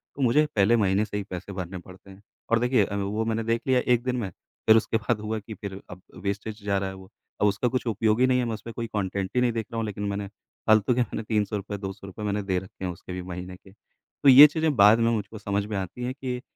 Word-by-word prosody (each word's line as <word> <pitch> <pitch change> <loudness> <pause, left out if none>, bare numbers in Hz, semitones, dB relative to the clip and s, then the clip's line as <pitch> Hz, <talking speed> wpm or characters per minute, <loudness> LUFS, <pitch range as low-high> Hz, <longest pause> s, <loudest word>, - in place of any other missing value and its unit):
तो 140 - -6
मुझे 135 +5 +4
पहले 105 +3 +4
महीने 100 0 +2
से 105 -1 -5
ही 105 - -2
पैसे 95 +2 -6
भरने 95 0 -5
पड़ते 95 +2 -14
हैं 95 +1 -14 0.3
और 115 - +4
देखिए 125 -2 +3
अभी 100 0 -3
वो 105 +3 -1
मैंने 115 0 -1
देख 115 +1 0
लिया 130 -1 +4
एक 120 -1 +1
दिन 125 -1 -1
में 110 -6 -3 0.4
फिर 110 0 +8
उसके 110 0 +1
बाद 110 +1 -1
हुआ 110 +1 -3
कि 105 +1 -9
फिर 100 -2 -7
अब 90 0 -10 0.2
वेस्टेज 105 +2 -4
जा 100 -1 +1
रहा 95 0 -2
है 95 - -8
वो 95 0 -13 0.3
अब 105 - +5
उसका 105 +5 +1
कुछ 125 +1 -1
उपयोग 110 0 +1
ही 130 - +5
नहीं 130 0 +3
है। 125 - 0
मैं 115 - -2
उसमें 110 +2 -7
कोई 115 0 -4
कंटेंट 95 -1 -2
ही 125 - +3
नहीं 125 -1 +3
देख 115 -1 -3
रहा 115 - -4
हूँ 115 - -1
लेकिन 105 -1 -5
मैंने 100 0 -3 0.4
फालतू 110 +2 +4
के 125 - +1
मैंने 115 -1 -3
₹300, 105 -1 -2
₹200 95 +1 -7
मैंने 105 0 -1
दे 95 -2 -1
रखे 95 0 -9
हैं 90 - -2
उसके 90 +1 -9
भी 90 - -4
महीने 90 0 -7
के। 95 +1 -18
तो 105 +6 -2
ये 135 +3 +11
चीज़ें 155 0 0
बाद 105 +1 +7
में 115 0 +3
मुझको 110 0 -3
समझ 100 0 -2
में 105 0 -5
आती 95 +6 -5
हैं 125 +1 -2
कि 130 -2 -5
105 Hz, 270 wpm, -26 LUFS, 100-115 Hz, 0.4 s, ये